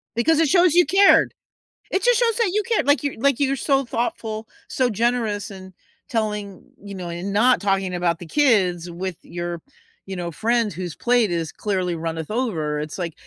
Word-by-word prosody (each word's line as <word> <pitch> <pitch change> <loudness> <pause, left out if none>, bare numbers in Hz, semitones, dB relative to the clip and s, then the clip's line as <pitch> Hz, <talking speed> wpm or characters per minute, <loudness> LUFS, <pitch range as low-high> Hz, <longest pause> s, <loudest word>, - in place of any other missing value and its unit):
Because 320 +7 +2
it 325 - +4
shows 350 +1 +4
you 355 0 +5
cared. 395 +1 +5 0.6
It 385 - 0
just - - +4
shows 465 -2 +2
that 445 -6 +1
you 425 0 +1
cared, 455 -10 0
like, 285 +1 +3
you 285 - -3
like, 280 +1 +2
you're 275 -1 +1
so 275 +1 +1
thoughtful, 225 -2 -3 0.2
so 255 -2 +1
generous, 225 -2 -1
and 190 -1 -11 0.4
telling 210 -4 -3 0.2
you 200 -1 -8
know, 180 -2 -6
and 175 +4 -4
not 245 +5 +4
talking 195 -2 0
about 175 -1 0
the 175 - -9
kids 180 - +2
with 175 0 -5
your 175 -1 -5 0.5
you 190 - -5
know, 175 -1 -4
friends 230 +4 0
whose 175 -3 -6
plate 240 -5 +2
is 165 -3 -2
clearly 185 -4 -2
runneth 160 +1 -4
over. 165 -12 -1
It's, 150 0 -6
like, 170 -4 -4
210 Hz, 190 wpm, -22 LUFS, 175-260 Hz, 0.6 s, you